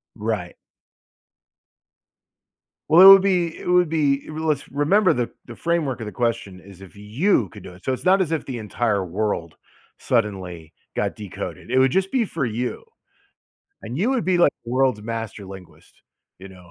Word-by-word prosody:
Right. 105 -5 -3 2.3
Well, 160 +4 +6
it - - +10
would 195 0 +9
be 180 -4 0
it - - -9
would 180 -2 +4
be 145 -3 +1
It - - -9
really 160 +1 -4
was 150 -3 -1
Remember 185 +8 +3
the 120 -1 -2 0.2
the 120 - -10
framework 165 -5 -1
of 115 - -5
the 105 - -6
question 100 -3 -2
is 95 0 -15
if 95 0 -14
you 110 - 0
could - - -13
do 90 - -10
it. 90 - -17
So 130 - -1
it's 130 - -7
not 190 +1 +4
as 170 -4 -1
if 160 - -2
the 130 -3 -5
entire 105 -2 -1
world 90 -3 -3 0.4
suddenly 95 -8 -2 0.2
got - - -1
decoded, 105 +2 -8
it 130 - +1
would 130 0 +4
just 190 +4 0
be 250 -4 +1
for 165 -8 -3
you. 120 - -4 1.0
And 125 - -5
you 215 +9 +1
would 260 -4 0
be, 185 -1 +1
like, 175 - +4
the 120 - -7
world's 130 -4 +1
master 115 -2 -5
linguist, 90 -5 -14 0.4
you 95 +1 -11
know? 90 -2 -16
120 Hz, 185 wpm, -22 LUFS, 100-165 Hz, 2.3 s, it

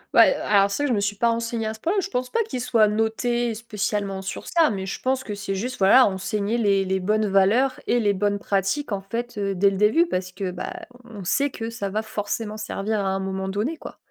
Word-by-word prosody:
Ouais, - - +7
heu, - - -6
alors, 200 -1 +4
ça 290 +9 -1
je 255 - +1
me 210 - +1
suis 200 0 -1
pas 235 +3 +2
renseignée 230 0 -2
à 220 - -2
ce 220 - -13
point-là, 345 - 0
mais - - +3
je 390 - -5
pense 250 0 -2
pas 460 - +1
qu'il 260 - -5
soit 225 -3 +3
noté 225 +2 0
spécialement 210 -3 -3
sur 195 - -6
ça, 330 -2 +3
mais 195 -3 -3
je 195 - -5
pense 260 0 0
que 210 - -5
c'est 200 -1 -4
juste, 250 +6 -4
voilà, 225 +7 +7
enseigner 205 +3 -1
les 200 -3 +2
les 190 0 0
bonnes 215 +3 +1
valeurs 210 +7 +3
et 245 - +3
les 205 -3 +2
bonnes 205 +1 0
pratiques, 200 +8 -1
en 200 -1 -1
fait, 230 +3 -5
heu, 195 -1 -1
dès 195 +2 +4
le 195 - -3
début. 215 - +4
Parce 185 - -3
que, 185 0 -4
bah, 180 0 -5 0.3
on 215 -5 -9
sait 280 +10 +1
que 230 -3 -6
ça 200 -3 -4
va 215 +3 -2
forcément 215 0 -4
servir 215 0 -2
à 195 - -1
un 190 0 -1
moment 190 0 -3
donné, 215 +12 -2
quoi. - - -10
210 Hz, 250 wpm, -24 LUFS, 195-235 Hz, 0.3 s, Ouais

